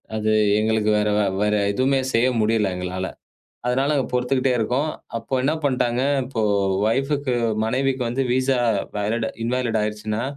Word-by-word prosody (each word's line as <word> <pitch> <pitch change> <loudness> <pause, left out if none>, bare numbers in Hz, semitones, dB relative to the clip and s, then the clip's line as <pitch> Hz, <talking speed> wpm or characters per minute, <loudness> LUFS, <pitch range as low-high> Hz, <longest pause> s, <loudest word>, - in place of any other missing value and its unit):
அது 110 0 0 0.3
எங்களுக்கு 110 0 +1
வேற 105 0 +1 0.3
வேற 105 - +1 0.2
எதுவுமே 130 +5 +1
செய்ய 115 +2 +3
முடியல 110 -2 +2
எங்களால. 90 +1 -3 0.6
அதனால 135 +4 +1 0.2
பொறுத்துக்கிட்டே 125 +1 +1
இருக்கோம். 125 +7 0 0.3
அப்ப 115 +3 -2
என்ன 140 +4 +2
பண்ணிட்டாங்க. 125 -2 +1 0.2
இப்போ 125 -4 -3 0.4
வைஃப்க்கு 135 +3 0 0.3
மனைவிக்கு 130 +3 0
வந்து 125 +3 -1
விசா 130 0 +1 0.9
இன்வேலிட் 120 -2 0
ஆயிடுச்சுன்னா, 105 +1 -2
125 Hz, 120 wpm, -22 LUFS, 110-130 Hz, 0.9 s, செய்ய